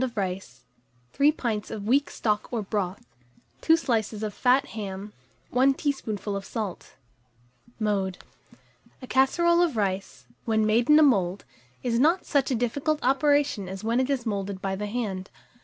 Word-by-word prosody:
of 245 -3 -4
rice, 185 -9 -4 0.5
3 285 +2 +4
pints 230 -8 -3
of 205 -2 -6
weak 275 +6 +2
stock 210 -2 -1
or 230 -3 -2
broth, 195 - -3 0.6
2 325 0 +5
slices 225 -7 -1
of 210 -1 -3
fat 260 +5 +2
ham, 205 -1 -6 0.4
1 265 +2 +4
teaspoonful 215 -9 -3
of 195 - -4
salt. 210 -4 -5 0.9
[Illustration: 215 - -1
CASSEROLE - - +3
OF 190 - -2
RICE.] - - -3
Mode. - - -25
A - - -7
casserole 340 +7 +3
of 325 -9 +1
rice, 195 -2 -2 0.2
when 220 -2 +2
made 225 +4 +2
in 300 - +8
a 310 - +7
mould, 195 -9 +2 0.4
is 235 -1 +1
not 330 +7 +3
such 280 -2 +1
a 260 - +1
difficult 275 +6 0
operation 275 -6 +2
as 190 +1 -7
when 230 +3 +1
it 260 +1 0
is 265 -4 -1
moulded 200 -3 -3
by 190 0 -2
the 210 +2 -4
hand. 205 -4 -3
225 Hz, 175 wpm, -26 LUFS, 200-270 Hz, 0.9 s, in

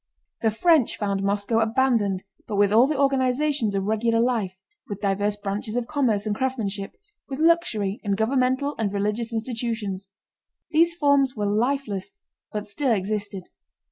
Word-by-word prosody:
The 225 - +3
French 295 +4 +3
found 200 -2 -1
Moscow 200 +3 0
abandoned 225 -5 +1 0.2
but 210 - -3
with 205 0 +3
all 235 +4 +6
the 295 -2 -1
organizations 270 -3 +1
of 195 - 0
regular 225 +2 +1
life, 230 -6 0 0.3
with 205 -1 -5
diverse 205 +1 0
branches 205 +2 -4
of 245 -1 0
commerce 235 -7 0
and 210 -1 -1
craftsmanship, 215 -6 -2 0.4
with 265 - -4
luxury, 310 - +1
and 200 -2 0
governmental 260 +5 +1
and 210 -3 0
religious 210 +3 -1
institutions. 225 -4 -3 0.6
These 335 +2 +4
forms 280 -4 +3
were 210 -2 -2
lifeless 215 - -1 0.4
but 210 -1 -4
still 255 +6 0
existed. 200 -2 -3
220 Hz, 145 wpm, -24 LUFS, 205-260 Hz, 0.6 s, all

